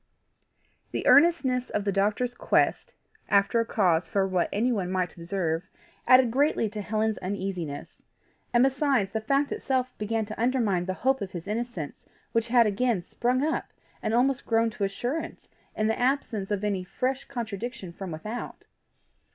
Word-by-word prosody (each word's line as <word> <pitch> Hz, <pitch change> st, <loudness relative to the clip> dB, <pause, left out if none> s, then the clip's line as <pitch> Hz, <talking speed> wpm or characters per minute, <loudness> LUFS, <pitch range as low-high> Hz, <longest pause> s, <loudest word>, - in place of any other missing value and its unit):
The -, -, -4 dB
earnestness 275 Hz, -6 st, +4 dB
of 210 Hz, -, -1 dB
the 200 Hz, -, +2 dB
doctor's 210 Hz, +6 st, +1 dB
quest -, -, +1 dB, 0.3 s
after 200 Hz, +3 st, +3 dB
a 230 Hz, -, +1 dB
cause 180 Hz, -5 st, +2 dB
for 195 Hz, -1 st, +1 dB
what 185 Hz, -2 st, 0 dB
anyone 210 Hz, -4 st, 0 dB
might 185 Hz, -2 st, -1 dB
observe, 170 Hz, -1 st, -2 dB, 0.4 s
added 255 Hz, -2 st, +6 dB
greatly 275 Hz, -2 st, +2 dB
to 210 Hz, -1 st, -4 dB
Helen's 215 Hz, +1 st, -1 dB
uneasiness; 185 Hz, -6 st, -5 dB, 0.5 s
and 240 Hz, 0 st, +4 dB
besides, 270 Hz, -6 st, +2 dB
the 220 Hz, +1 st, -2 dB
fact 275 Hz, +5 st, +1 dB
itself 255 Hz, -1 st, -1 dB
began 220 Hz, +1 st, -1 dB
to 215 Hz, +1 st, -6 dB
undermine 230 Hz, -8 st, +1 dB
the 185 Hz, 0 st, -2 dB
hope 265 Hz, +4 st, +1 dB
of 190 Hz, -2 st, -5 dB
his 175 Hz, -2 st, -6 dB
innocence 210 Hz, -, -4 dB, 0.2 s
which 230 Hz, 0 st, +1 dB
had 235 Hz, 0 st, +5 dB
again 210 Hz, -2 st, +1 dB
sprung 250 Hz, +8 st, 0 dB
up 315 Hz, +1 st, -2 dB, 0.3 s
and 220 Hz, -, 0 dB
almost 265 Hz, +2 st, +1 dB
grown 225 Hz, 0 st, +2 dB
to 205 Hz, -2 st, -2 dB
assurance 245 Hz, +10 st, -4 dB, 0.3 s
in 215 Hz, -, 0 dB
the 220 Hz, +2 st, 0 dB
absence 245 Hz, -6 st, 0 dB
of 205 Hz, -1 st, -1 dB
any 200 Hz, -3 st, 0 dB
fresh 255 Hz, +8 st, -2 dB
contradiction 230 Hz, -6 st, -5 dB
from 190 Hz, +1 st, -7 dB
without. 210 Hz, +9 st, -6 dB
220 Hz, 160 wpm, -27 LUFS, 195-250 Hz, 0.5 s, added